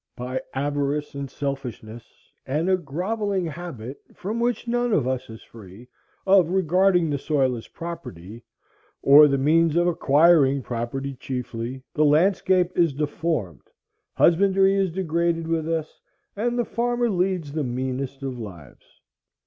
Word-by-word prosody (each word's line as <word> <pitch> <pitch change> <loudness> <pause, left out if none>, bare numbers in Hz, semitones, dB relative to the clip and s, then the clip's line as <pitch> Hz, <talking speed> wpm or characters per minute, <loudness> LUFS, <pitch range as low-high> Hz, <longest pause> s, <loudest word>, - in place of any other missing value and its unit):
By 125 +1 -4
avarice 145 +1 -1
and 140 -1 -5
selfishness, 125 -5 -7 0.2
and 150 +6 -1
a - - +5
grovelling 185 +5 -2
habit, 145 -6 -7
from 215 +5 -4
which 240 0 -1
none 240 -1 0
of 140 -10 +2
us 130 -2 -3
is 110 0 -11
free, 110 +2 -14 0.4
of 190 -3 +5
regarding 180 -1 +2
the 140 - -1
soil 135 -4 +1
as 115 - -9
property, 120 - -8 0.6
or 145 +2 +8
the 140 -1 +1
means 160 +3 +3
of 175 0 +3
acquiring 145 -4 +4
property 125 +4 -4
chiefly, 125 -1 -5
the 155 - +2
landscape 180 +3 +3
is 165 -5 +2
deformed, 145 - -3 0.5
husbandry 195 +2 +4
is 195 -1 +1
degraded 170 -1 -1
with 165 -1 -1
us, 160 -2 -3 0.3
and 240 +4 -1
the 240 - +1
farmer 240 +1 0
leads 180 -5 -1
the 155 0 -2
meanest 130 +2 -4
of 130 -2 -4
lives. 85 - -12
150 Hz, 140 wpm, -24 LUFS, 130-180 Hz, 0.6 s, or